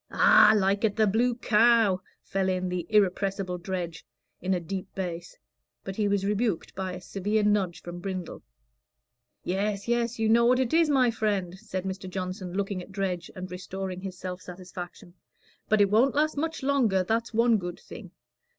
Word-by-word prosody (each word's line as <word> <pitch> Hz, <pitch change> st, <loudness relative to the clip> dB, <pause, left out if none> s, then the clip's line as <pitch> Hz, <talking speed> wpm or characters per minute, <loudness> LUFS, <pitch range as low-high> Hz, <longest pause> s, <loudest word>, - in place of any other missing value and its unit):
"Aw, 215 Hz, -, +6 dB
like 195 Hz, +1 st, +1 dB
at 210 Hz, -2 st, +2 dB
the 220 Hz, -, +3 dB
Blue 235 Hz, +4 st, +2 dB
Cow," 225 Hz, -4 st, +4 dB, 0.2 s
fell 190 Hz, 0 st, -1 dB
in 185 Hz, 0 st, -1 dB
the 180 Hz, -1 st, -3 dB
irrepressible 195 Hz, -2 st, +1 dB
Dredge, 175 Hz, -2 st, -4 dB, 0.4 s
in 185 Hz, +1 st, +1 dB
a -, -, -1 dB
deep 185 Hz, +3 st, -5 dB
bass; 175 Hz, -2 st, -5 dB, 0.5 s
but 195 Hz, -, -6 dB
he 210 Hz, 0 st, +1 dB
was 200 Hz, -1 st, +1 dB
rebuked 210 Hz, -2 st, -1 dB
by 185 Hz, -1 st, -4 dB
a 180 Hz, -, -6 dB
severe 205 Hz, +3 st, -1 dB
nudge 205 Hz, -4 st, +1 dB
from 175 Hz, 0 st, -7 dB
Brindle. 185 Hz, -2 st, -5 dB, 1.0 s
"Yes, 200 Hz, +2 st, -2 dB
yes, 240 Hz, 0 st, 0 dB
you 220 Hz, -1 st, +1 dB
know 235 Hz, +2 st, +5 dB
what 250 Hz, +1 st, +4 dB
it 260 Hz, 0 st, 0 dB
is, 325 Hz, -1 st, +4 dB
my 260 Hz, -4 st, +4 dB
friend," 200 Hz, -5 st, -1 dB
said 190 Hz, -4 st, -5 dB
Mr. 190 Hz, 0 st, -5 dB
Johnson, 185 Hz, 0 st, -5 dB
looking 195 Hz, -1 st, -2 dB
at 180 Hz, -, -12 dB
Dredge, 185 Hz, -3 st, -3 dB
and 185 Hz, -1 st, -7 dB
restoring 185 Hz, 0 st, -5 dB
his 190 Hz, -1 st, -6 dB
self 180 Hz, 0 st, -6 dB
satisfaction. 180 Hz, -1 st, -9 dB, 0.6 s
"But 215 Hz, -1 st, +4 dB
it 200 Hz, -1 st, +3 dB
won't 245 Hz, +6 st, +4 dB
last 310 Hz, +1 st, +2 dB
much 320 Hz, 0 st, -3 dB
longer, 245 Hz, -9 st, +2 dB
that's 225 Hz, +5 st, -1 dB
one 230 Hz, 0 st, +4 dB
good 175 Hz, -1 st, -6 dB
thing. -, -, -11 dB
195 Hz, 180 wpm, -27 LUFS, 185-220 Hz, 1.0 s, Aw